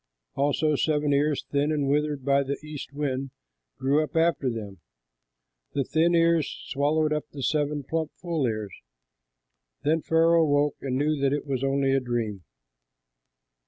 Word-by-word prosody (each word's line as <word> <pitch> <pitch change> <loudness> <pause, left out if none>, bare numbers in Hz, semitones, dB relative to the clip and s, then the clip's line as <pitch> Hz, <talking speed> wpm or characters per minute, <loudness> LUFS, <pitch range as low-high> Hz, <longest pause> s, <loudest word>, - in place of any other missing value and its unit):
Also 145 +2 +1
seven 150 0 +1
ears, 145 +1 +1
thin 145 +2 +1
and 145 -3 0
withered 145 -1 0
by 140 0 +4
the 140 +1 -3
east 150 -2 -7
wind, 135 -2 -2 0.5
grew 140 +4 +2
up 155 - -8
after 165 -5 +2
them. 105 -5 -6 0.9
The 140 - +1
thin 165 +6 +2
ears 165 -2 +3 0.2
swallowed 150 +2 +1
up 150 - -2
the 140 -2 -7
seven 150 0 0
plump, 160 +2 -2
full 165 -7 -1
ears. 110 -3 -3 1.1
Then 155 +2 +2
Pharaoh 165 +1 +4
awoke, 145 -2 +2
and 130 -2 -2
knew 150 0 0
that 140 0 +2
it 145 - -2
was 135 -2 -2
only 135 0 +1
a 135 - +3
dream. 115 -6 -3
145 Hz, 155 wpm, -26 LUFS, 135-155 Hz, 1.1 s, by